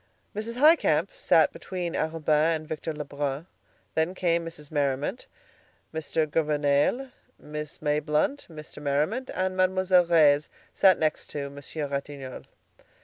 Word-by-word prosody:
Mrs. 220 +3 -4
Highcamp 310 +6 +4
sat - - +3
between 180 -3 -5
Arobin 160 0 +1
and 155 0 -7
Victor 155 +1 -4
Lebrun. 145 0 -4 0.5
Then 160 +4 0
came 170 -2 +1
Mrs. 155 -3 -8
Merriman, 145 - -1 0.7
Mr. 160 0 -1
Gouvernail, 150 - +1 0.3
Miss 150 0 -7
Mayblunt, 150 - 0
Mr. 150 -2 -10
Merriman, 150 - 0
and 185 0 -1
Mademoiselle 185 -1 +3
Reisz 150 -3 +4 0.5
next 155 -1 -1
to 140 -1 -5
Monsieur 145 +2 -5
Ratignolle. 140 -1 -6
155 Hz, 115 wpm, -27 LUFS, 145-180 Hz, 0.7 s, Highcamp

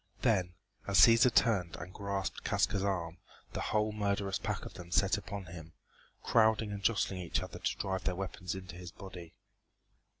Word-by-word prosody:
Then, 95 -7 +2 0.3
as 100 -1 +4
Cæsar 120 +2 +8
turned 100 -10 +2
and 90 +3 -8
grasped 100 -1 -3
Casca's 95 - +1
arm, 85 -4 -2 0.3
the - - -3
whole 105 0 +1
murderous 100 -2 -1
pack - - -3
of - - -8
them 85 -1 -10
set 95 +4 +3
upon 100 -1 -6
him, 80 -2 -10 0.5
crowding 110 -1 +3
and 100 -1 -5
jostling 100 -2 +1
each 90 -2 -1
other - - -8
to - - -1
drive 95 -1 -2
their 90 - 0
weapons 90 -1 -4
into 95 -2 -8
his 90 -1 -8
body. 90 -4 -10
95 Hz, 170 wpm, -32 LUFS, 90-105 Hz, 0.5 s, Cæsar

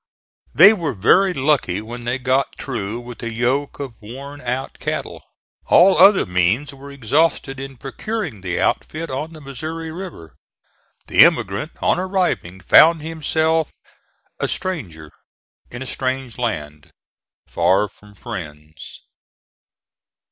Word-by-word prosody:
They 195 +6 +9
were 170 -8 -3
very 185 - +4
lucky 135 - +1
when 120 +3 -8
they 120 +2 -1
got 130 +1 0
through 115 -3 -5
with 120 -2 -10
a 115 - -4
yoke 125 +5 -1
of 135 -4 -5
worn 140 +6 -9
out 125 +2 -4
cattle. - - -4 0.5
All 185 +2 +6
other 195 -1 +6
means 95 +11 0
were 140 +1 -12
exhausted 140 +1 0
in 135 -1 -8
procuring 150 - -5
the 90 -2 -3
outfit 165 0 -1
on 150 +5 -4
the 155 - -12
Missouri 160 +4 -6
River. 165 - -9 0.7
The - - +6
immigrant, 100 - +1
on - - +2
arriving, 180 - -1
found 160 - +6
himself 160 0 0 0.6
a - - 0
stranger, 90 - -5 0.6
in 120 +2 -7
a - - -9
strange 130 -2 -3
land, 75 -9 -4 0.6
far 100 +3 +2
from 105 0 -20
friends. 80 -8 -9
130 Hz, 125 wpm, -20 LUFS, 105-160 Hz, 0.7 s, They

